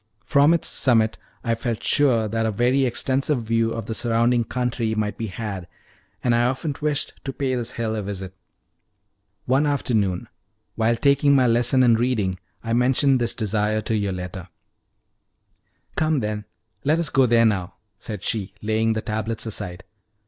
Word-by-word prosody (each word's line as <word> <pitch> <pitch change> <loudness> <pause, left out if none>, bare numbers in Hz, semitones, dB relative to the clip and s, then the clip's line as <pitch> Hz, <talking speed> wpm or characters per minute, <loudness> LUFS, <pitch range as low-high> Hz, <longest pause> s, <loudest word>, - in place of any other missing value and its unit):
From 140 +7 +4
its 170 - +2
summit 115 -4 +2 0.2
I 115 - +1
felt 115 -1 -3
sure 125 -7 +3
that 115 +1 -1
a - - +1
very 125 +5 +2
extensive 130 +2 0
view 115 0 +1
of 115 -2 -4
the 115 - -4
surrounding 115 +1 +2
country 120 -2 -1
might 105 -1 -1
be 115 - -4
had, 95 -3 -5 0.6
and 120 - +2
I 120 0 +3
often 135 +3 -2
wished 150 -1 -1
to 135 - -3
pay 135 -1 -2
this 120 -1 -3
hill 110 -1 -2
a 110 - -2
visit. 95 -2 -6 1.1
One 135 +4 +2
afternoon, 110 -10 0 0.5
while 115 +1 +2
taking 140 +2 +4
my 130 -2 +4
lesson 120 +2 +3
in 120 -2 +5
reading, 110 -7 0 0.2
I 115 -1 -2
mentioned 130 +2 +3
this 120 - 0
desire 110 0 0
to 110 - -1
Yoletta. 95 -3 -4 1.5
"Come, 155 -3 +1
then, 105 -1 -3 0.4
let 150 +3 +2
us 165 -4 -1
go 135 -1 +4
there 115 0 +4
now," 95 -5 0 0.2
said 105 -4 -7
she, 105 -4 -2
laying 110 +1 +1
the 110 - -2
tablets 110 +1 -3
aside. 90 -4 -5
115 Hz, 165 wpm, -23 LUFS, 110-130 Hz, 1.5 s, in